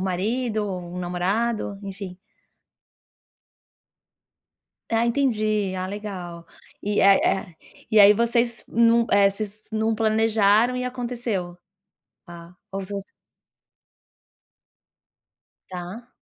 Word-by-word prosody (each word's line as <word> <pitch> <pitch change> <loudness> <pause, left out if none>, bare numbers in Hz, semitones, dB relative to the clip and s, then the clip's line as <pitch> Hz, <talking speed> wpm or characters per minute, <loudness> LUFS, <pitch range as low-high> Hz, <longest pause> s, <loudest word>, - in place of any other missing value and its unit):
marido, 215 +4 -1
o 180 -2 -6
namorado, 195 +4 -1
enfim. 195 -2 -7 2.7
Ah, 230 +1 +2
entendi, 215 -6 +1
ah 185 0 -3
legal. 185 -4 -7 0.4
E, 205 +1 -1
eh 195 0 +6
eh, 190 -4 -1 0.4
e 215 - +7
aí 205 +1 +9
vocês 235 +1 0
não 230 0 +3
eh, 200 -1 +5
vocês 210 +1 -7
não 220 +1 0
planejaram 220 +1 +3
e 250 - -2
aconteceu? 240 -8 -4 0.7
Ah 170 0 -12 0.2
ou 195 0 -3
vo 200 +1 -5 2.7
Tá. 185 +6 -8
210 Hz, 90 wpm, -24 LUFS, 185-230 Hz, 2.7 s, aí